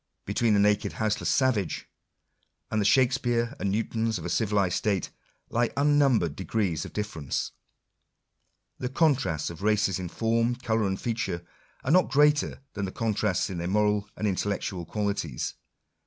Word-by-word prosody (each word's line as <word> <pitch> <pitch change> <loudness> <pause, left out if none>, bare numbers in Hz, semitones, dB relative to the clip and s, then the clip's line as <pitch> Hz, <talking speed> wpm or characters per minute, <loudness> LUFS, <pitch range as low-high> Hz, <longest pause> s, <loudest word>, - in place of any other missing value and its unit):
Between 110 +2 +2
the - - +4
naked 105 0 +2
houseless 110 -1 -1
savage, 125 - +1 0.8
and 110 - +1
the - - 0
Shakspeare8 125 +1 +2
and 100 - 0
Newtons 110 +2 0
of 85 - -7
a 85 - -2
civilized 100 -4 +1
state, 100 -5 0 0.4
lie 120 0 +2
unnumbered 140 - +3
degrees 95 -3 -1
of - - -8
difference. 80 -10 -3 1.3
The 125 - -2
contrasts 130 - +1
of 85 - -10
races 105 -3 +2
in 90 -2 -4
form, 115 +4 +1
colour, 115 -4 0
and 95 0 -2
feature, 115 -7 -2 0.4
are 130 - 0
not 185 +2 +5
greater 150 -1 +3
than 100 -1 -2
the 95 - -5
contrasts 105 -5 0
in 90 - -4
their 85 - -2
moral 105 +1 +1
and 105 - -2
intellectual 95 -2 -2
qualities. 100 - -2
105 Hz, 150 wpm, -27 LUFS, 95-120 Hz, 1.3 s, not